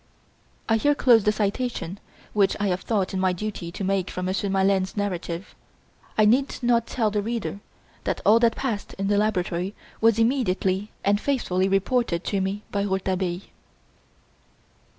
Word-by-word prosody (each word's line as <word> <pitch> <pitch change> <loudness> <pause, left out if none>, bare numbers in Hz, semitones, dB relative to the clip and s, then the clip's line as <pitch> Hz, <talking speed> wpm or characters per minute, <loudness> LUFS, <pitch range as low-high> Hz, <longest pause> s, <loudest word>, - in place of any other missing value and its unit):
I 225 - +3
here 290 +6 +2
close 235 -7 +5
the 210 - +5
citation 210 -2 -2 0.3
which 200 -2 +2
I 205 -1 +1
have 180 0 -1
thought 200 -5 -1
it - - -1
my 185 -1 +2
duty 180 -2 -5
to 195 - -5
make 190 -1 0
from 180 - -4
Monsieur 190 +2 -1
Maleine's 190 0 +1
narrative. 180 -3 -3 0.6
I 215 - +5
need 260 +6 +3
not 235 -1 +2
tell 220 -4 0
the 205 0 0
reader 225 -2 -3 0.5
that - - -1
all 220 +3 +6
that 230 -1 +3
passed 230 -7 -3
in 195 0 -2
the 205 - +3
laboratory 190 -2 -1 0.3
was 225 -1 +4
immediately 210 -5 +1 0.2
and 205 +1 +3
faithfully 195 -9 0
reported 195 -2 +1
to 200 -2 -1
me 195 +2 -2
by 200 - 0
Rouletabille. 190 -2 -1
200 Hz, 160 wpm, -25 LUFS, 190-225 Hz, 0.6 s, all